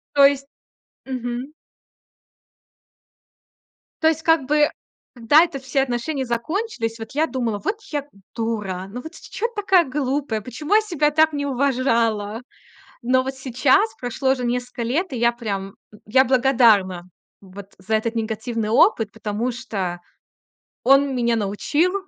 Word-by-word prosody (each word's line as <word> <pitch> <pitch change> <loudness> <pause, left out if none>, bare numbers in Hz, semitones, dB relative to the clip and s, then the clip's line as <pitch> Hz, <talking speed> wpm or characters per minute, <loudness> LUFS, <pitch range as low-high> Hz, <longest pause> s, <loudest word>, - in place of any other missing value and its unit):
То 280 -1 +7
есть 275 -1 0 0.6
мгм. 250 +1 -4 2.5
То 320 - +6
есть, 320 0 0
как 325 -4 +3
бы, 300 +1 +3 0.4
да 250 +6 +5
это 325 -5 -5
все 270 +1 0
отношения 265 +2 -2
закончились, 235 - -3
вот 225 +2 -8
я 305 +3 +1
думала: 240 -7 -2
"Вот 420 - -1 0.2
я, 295 - 0
м, 275 -9 -21
дура, 210 -5 -3
ну 245 +4 -7
вот 320 +2 -10
с - - -13
чё 460 - -3
ты - - -19
такая 380 -3 +4
глупая, 270 -4 -2
почему 295 - -3
я 435 - +7
себя 335 -9 0
так 315 +1 +3
не 285 0 -2
уважала"? 235 -6 0 0.6
Но 255 +2 +3
вот 265 0 -4
сейчас 270 - +2
прошло 255 +2 0
уже 260 -2 -1
несколько 245 0 -3
лет, 280 +9 -1
и - - -3
я 235 +1 +3
прям, 200 -5 -5 0.2
э, - - -14
я 260 +5 +4
благодарна 230 -9 +3 0.3
вот 195 0 -12
за 190 +4 -5
этот 225 +2 -1
негативный 220 0 -2
опыт, 225 - +3
потому 220 +3 -3
что 200 -8 -4 0.8
он 275 +1 +4
меня 235 -1 +1
научил 230 - 0
250 Hz, 150 wpm, -22 LUFS, 225-285 Hz, 2.5 s, То